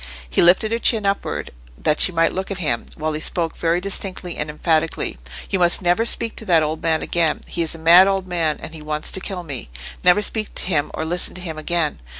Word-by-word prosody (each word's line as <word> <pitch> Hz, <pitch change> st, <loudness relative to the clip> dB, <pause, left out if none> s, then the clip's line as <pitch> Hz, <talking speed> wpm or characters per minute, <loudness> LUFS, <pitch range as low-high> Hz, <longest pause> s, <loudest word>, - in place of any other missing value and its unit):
He -, -, +1 dB
lifted 185 Hz, +5 st, +4 dB
her 230 Hz, -, 0 dB
chin 220 Hz, -3 st, +3 dB
upward, 200 Hz, 0 st, -2 dB, 0.3 s
that 150 Hz, -, 0 dB
she -, -, +6 dB
might 165 Hz, -1 st, +1 dB
look 190 Hz, +1 st, -4 dB
at 195 Hz, -, -3 dB
him, 145 Hz, -10 st, -1 dB
while 155 Hz, 0 st, -3 dB
he 155 Hz, -, -4 dB
spoke 165 Hz, 0 st, -1 dB
very 170 Hz, +1 st, 0 dB
distinctly 185 Hz, -2 st, -2 dB
and 150 Hz, -, -4 dB
emphatically. 160 Hz, +1 st, -1 dB, 0.3 s
"You 190 Hz, -, +1 dB
must 175 Hz, +2 st, +3 dB
never 180 Hz, +6 st, +2 dB
speak 230 Hz, -1 st, -1 dB
to 220 Hz, -, -5 dB
that 170 Hz, -5 st, +4 dB
old 155 Hz, +1 st, -3 dB
man 160 Hz, -1 st, 0 dB
again. 165 Hz, -3 st, +1 dB
He 170 Hz, -, -4 dB
is 165 Hz, 0 st, -2 dB
a -, -, -9 dB
mad 170 Hz, +4 st, +7 dB
old 195 Hz, -1 st, 0 dB
man, 165 Hz, -4 st, -1 dB
and 160 Hz, -, -8 dB
he 160 Hz, -, -9 dB
wants 150 Hz, 0 st, -1 dB
to -, -, 0 dB
kill 185 Hz, -2 st, -6 dB
me. 140 Hz, -, -6 dB, 0.3 s
Never 180 Hz, +4 st, +5 dB
speak 215 Hz, 0 st, -3 dB
to -, -, +3 dB
him 155 Hz, -6 st, 0 dB
or 160 Hz, -, -3 dB
listen 175 Hz, +2 st, -1 dB
to 180 Hz, -, -6 dB
him 160 Hz, -3 st, -6 dB
again." 165 Hz, -1 st, -1 dB
170 Hz, 235 wpm, -20 LUFS, 155-190 Hz, 0.3 s, mad